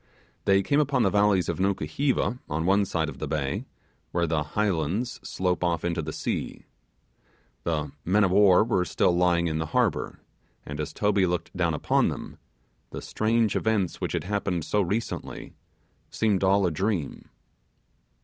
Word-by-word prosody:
They 95 0 +4
came 140 +5 +2
upon 140 -4 +2
the 95 - +2
valleys 100 -2 +3
of - - -2
Nukuheva 100 - 0
on 80 +2 -1
one 100 +2 +3
side 80 -4 -1
of 80 - -8
the 75 - -3
bay, 70 -2 -2 0.5
where 85 -1 +1
the 80 -1 0
highlands 95 - -1
slope 90 -1 -1
off 85 -2 0
into 85 -1 -1
the 80 0 -5
sea. - - -4 1.0
The 75 -4 -1
men 100 +6 +3
of 95 - +2
war 100 -1 +6
were 110 -5 +1
still 90 -1 +1
lying 85 -1 +3
in 80 -1 -1
the 80 - -2
harbour, - - 0 0.5
and 75 0 -6
as 75 - -3
Toby 105 -2 +2
looked 90 0 -3
down 85 -3 +1
upon - - +2
them, - - -7 0.5
the - - -6
strange 110 0 0
events 105 -6 0
which - - -2
had - - -1
happened 95 -4 -2
so 105 - +1
recently, 105 +5 -4 0.6
seemed 105 -4 +1
all 95 +1 +4
a 90 - +1
dream. 90 -2 -2
90 Hz, 165 wpm, -26 LUFS, 80-105 Hz, 1.0 s, war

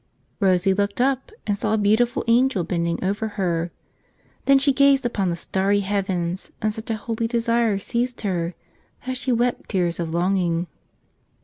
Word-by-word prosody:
Rosie 190 -1 +3
looked 200 +2 -1
up 265 +4 +1
and 205 - +1
saw 215 +2 0
a - - +1
beautiful 220 +4 +2
angel 235 -4 +3
bending 170 0 -1
over 205 +4 -1
her. 170 -3 0 0.8
Then 275 0 +6
she 275 0 +3
gazed 280 -1 +4
upon 200 -6 0
the 170 - -1
starry 195 +3 0
heavens, 190 -3 -2
and 215 0 0
such 220 +2 -8
a 225 - +1
holy 225 +1 -2
desire 230 -2 +1
seized 240 +5 -2
her 175 -4 -2 0.5
that 255 0 -2
she 255 +1 -2
wept 240 +1 0
tears 175 -4 0
of 170 -2 -2
longing. 175 -1 +1
205 Hz, 165 wpm, -23 LUFS, 180-235 Hz, 0.8 s, Then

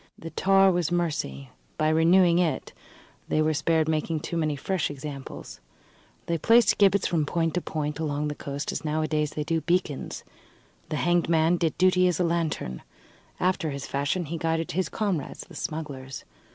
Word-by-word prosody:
The 165 - -8
tar 195 0 +4
was 175 -2 0
mercy: 150 - -2 0.3
by 155 0 +2
renewing 170 +2 +5
it 160 -6 -1 0.5
they - - +1
were 155 0 +2
spared 160 +1 +1
making 155 0 -1
too 170 - -5
many 155 -3 0
fresh 180 +4 -1
examples. 135 - -8 0.7
They 170 -1 -1
placed 230 +3 +4
gibbets 200 -1 +4
from 165 -3 +1
point 165 +2 0
to 180 - 0
point 150 -1 -3
along 150 -1 -1
the 150 - -2
coast, 140 0 -4
as - - -4
nowadays 155 -1 0
they 150 - -2
do 165 +1 -1
beacons. 175 -5 -1 0.7
The - - -2
hanged 175 +2 +1
man 165 +1 +3
did 165 -3 -1
duty 185 0 +4
as 175 -3 0
a - - +3
lantern. 165 - -1 0.6
After 180 -3 +1
his 140 -1 -5
fashion, 145 +6 -1
he 165 +2 -5
guided 165 0 -1
his 185 +2 -1
comrades, 195 -10 -2
the - - -13
smugglers. 140 -4 -6
160 Hz, 170 wpm, -26 LUFS, 150-175 Hz, 0.7 s, renewing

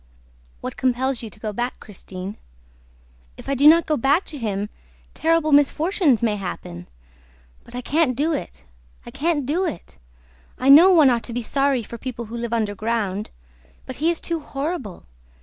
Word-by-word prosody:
"What - - -6
compels 260 0 0
you 225 - -7
to 210 - -18
go 215 -1 -4
back, 240 +4 -3
Christine?" 190 -1 -9 1.0
"If - - -12
I 275 - 0
do 280 +2 +4
not 330 +1 +7
go 305 - 0
back 285 +9 +2
to - - -6
him, 205 -3 -2 0.4
terrible 325 -1 +1
misfortunes 290 - +3
may 215 -3 +1
happen!... 90 - -7 0.8
But - - -13
I 250 - -3
can't 285 -1 +1
do 315 +4 +1
it, 65 - -6 0.4
I - - -9
can't 305 -2 -1
do 320 +8 0
it!... 325 - -6 0.6
I 260 - +1
know 320 +7 +9
one 315 -8 +6
ought 235 -1 +1
to 235 - -6
be 245 0 -3
sorry 275 0 +1
for 235 +2 -9
people 240 -1 -6
who 225 +2 -8
live 235 -1 -4
underground... 215 -2 -2 0.6
But 260 - -8
he 315 +5 +1
is 340 - 0
too 335 -1 -3
horrible! 280 - -5
255 Hz, 175 wpm, -22 LUFS, 220-305 Hz, 1.0 s, know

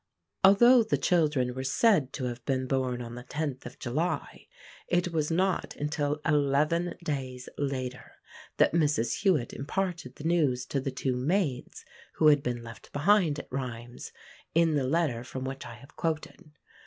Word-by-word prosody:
Although 240 +6 +7
the 220 - 0
children 150 -8 +2
were 130 +1 -4
said 160 - +3
to 135 - -4
have 120 -1 -4
been 130 -2 0
born 130 -2 -1
on 115 0 -8
the 125 0 -8
10th 140 -1 -4
of 125 - -11
July 155 +8 -3 0.4
it 175 0 0
was 155 -2 0
not 185 +2 0
until 150 0 -1
eleven 155 +3 +2
days 130 -5 -4
later 130 -3 -4 0.4
that - - +4
Mrs 145 -8 +1
Hewit 160 - +2
imparted 170 -1 -3
the - - -10
news 150 -7 +1
to 140 - -2
the 135 - -2
two 130 -1 -2
maids 140 0 -1 0.3
who 155 - +5
had 145 -1 +5
been 120 -2 -3
left 115 -2 -11
behind 165 0 +3
at - - -9
Rheims, 120 -2 -6 0.4
in 165 -1 +4
the 140 -3 +1
letter 145 -6 0
from 130 +1 -6
which 135 +1 -5
I - - -9
have 135 - -17
quoted. 155 -1 -4
145 Hz, 165 wpm, -29 LUFS, 125-165 Hz, 0.4 s, Although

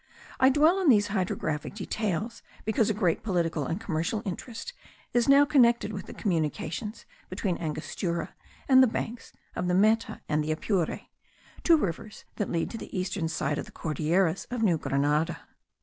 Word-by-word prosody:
I 260 - +6
dwell 310 +7 +4
on 365 -6 +3
these 205 -5 +5
hydrographic 180 -5 -2
details 215 +1 -3 0.2
because 220 0 +2
a - - +2
great 180 -6 +1
political 170 - -1
and 165 - -2
commercial 180 +1 -2
interest 230 - -6 0.4
is 240 +1 +2
now 280 +1 +7
connected 240 -6 +3
with 195 - -6
the - - -8
communications 170 +3 -2 0.2
between 185 -5 -2
Angostura 170 +2 -3 0.3
and 260 -1 +7
the 260 - +6
banks 230 +1 -4 0.2
of 180 - -2
the 180 - +2
Meta 215 +4 +2
and 150 0 +1
the 155 - -2
Apure, 170 +2 -1 0.6
two 335 -2 +5
rivers 210 - -4
that 210 - -1
lead 165 -1 -1
to 225 - -6
the - - -7
eastern 185 -2 -2
side 150 -2 -1
of - - -5
the - - -13
Cordilleras 165 +3 0
of 245 -2 -2
New 175 -7 +3
Grenada. 150 +5 0
195 Hz, 165 wpm, -28 LUFS, 165-225 Hz, 0.6 s, now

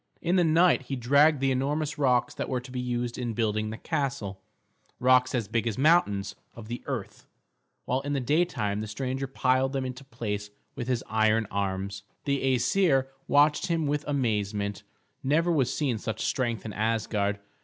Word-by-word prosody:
In 175 +2 0
the 180 - +4
night 165 +1 +4
he 135 - -2
dragged 140 +4 +4
the 135 0 +2
enormous 145 +3 -1
rocks 125 -4 +2
that - - -4
were 130 - 0
to 125 +1 -12
be 125 - -4
used 120 -1 -2
in 120 -3 -3
building 110 -1 0
the 110 - -5
castle, 135 -12 -3 0.6
rocks 130 +1 +4
as 115 -4 -1
big 115 +2 -1
as 110 - -2
mountains 105 - +3 0.2
of 115 -1 -10
the 120 - -4
earth; - - -5 0.6
while 130 +2 0
in 145 +1 -3
the 140 - +1
daytime 120 -8 0
the 110 - -4
stranger 130 +5 -3
piled 130 0 +1
them 135 -1 -1
into 130 +1 -6
place 105 -6 -4 0.2
with 120 - -5
his 125 -3 0
iron 110 0 +2
arms. 100 0 -2 0.2
The 135 -2 +1
Æsir 135 -1 +2 0.2
watched 145 +1 +4
him 165 -2 0
with 145 +1 0
amazement; 105 -7 -1 0.4
never 160 +6 +2
was 135 -6 +2
seen 135 -6 -1
such 110 0 -3
strength 120 -4 -1
in 110 - -5
Asgard. 105 -2 0
125 Hz, 175 wpm, -27 LUFS, 110-140 Hz, 0.6 s, the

